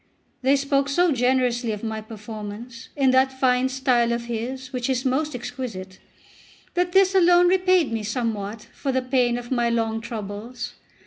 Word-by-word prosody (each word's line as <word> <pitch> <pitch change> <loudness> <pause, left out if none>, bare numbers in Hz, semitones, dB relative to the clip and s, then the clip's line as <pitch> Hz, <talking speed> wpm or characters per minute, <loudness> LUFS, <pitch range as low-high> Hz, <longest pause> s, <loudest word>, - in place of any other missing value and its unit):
They 270 +2 +4
spoke 275 0 +1
so 350 +4 +3
generously 250 -2 +1
of 210 - -7
my 220 -1 -3
performance, 220 +2 -8
in 270 -3 +3
that 260 +1 +4
fine 260 -1 +2
style 255 -3 +2
of 235 0 -2
his 255 +3 -5
which 250 0 -2
is 260 -1 0
most 275 +3 0
exquisite, 240 -7 -6 0.7
that 355 0 0
this 385 0 +5
alone 355 -1 +5
repaid 370 -4 +3
me 225 - -1
somewhat 215 -2 -3
for 275 - -2
the 260 0 0
pain 250 -2 +1
of 240 +1 -8
my 240 -2 +2
long 225 -1 0
troubles. 225 +2 -6
250 Hz, 165 wpm, -24 LUFS, 230-270 Hz, 0.7 s, this